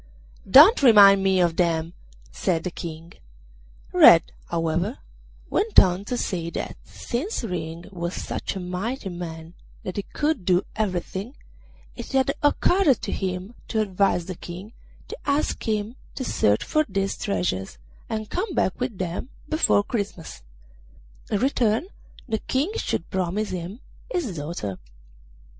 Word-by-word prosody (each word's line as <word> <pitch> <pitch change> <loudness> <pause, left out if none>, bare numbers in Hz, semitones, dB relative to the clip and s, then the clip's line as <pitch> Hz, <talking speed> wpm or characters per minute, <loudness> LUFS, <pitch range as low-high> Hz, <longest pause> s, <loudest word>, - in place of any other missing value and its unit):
'Don't 305 - +8
remind 200 -6 +8
me 190 -1 +3
of 170 -2 +2
them!' 165 -1 +1 0.4
said 160 - -1
the 180 - -3
King. 165 0 -8 0.8
Red, - - +7 0.2
however, 170 - -1 0.5
went 425 +2 +5
on 185 +2 +2
to 245 - -2
say 170 -7 -2
that, - - -5
since 275 - -4
Ring 170 -4 -5
was 170 -1 -4
such - - -4
a - - -3
mighty 190 +6 -4
man 165 -2 -7 0.3
that 185 - -5
he - - +1
could 295 - -2
do 180 +1 +3
everything, 200 +3 -3 0.6
it - - -8
had 270 +1 +2
occurred 345 +3 +4
to - - -6
him 185 +2 -3
to 220 - -1
advise 195 -4 +1
the 185 - -5
King 180 +5 -9 0.3
to - - -6
ask 285 +1 0
him 215 +2 -1 0.2
to 260 - -4
search 105 - +2
for 310 - +2
these 195 0 -1
treasures, 95 -5 -2 0.3
and 215 -1 -4
come 370 -1 -2
back 185 - 0
with 250 -5 -3
them 180 +7 -4 0.2
before 310 -10 +3
Christmas; 200 -7 -5 0.9
in 210 - +1
return 240 - +1 0.4
the 220 -3 -1
King 275 - -1
should 165 - -3
promise 190 +3 -1
him 185 +6 -6 0.3
his 295 - -2
daughter. 145 - -5
195 Hz, 140 wpm, -24 LUFS, 175-240 Hz, 0.9 s, Don't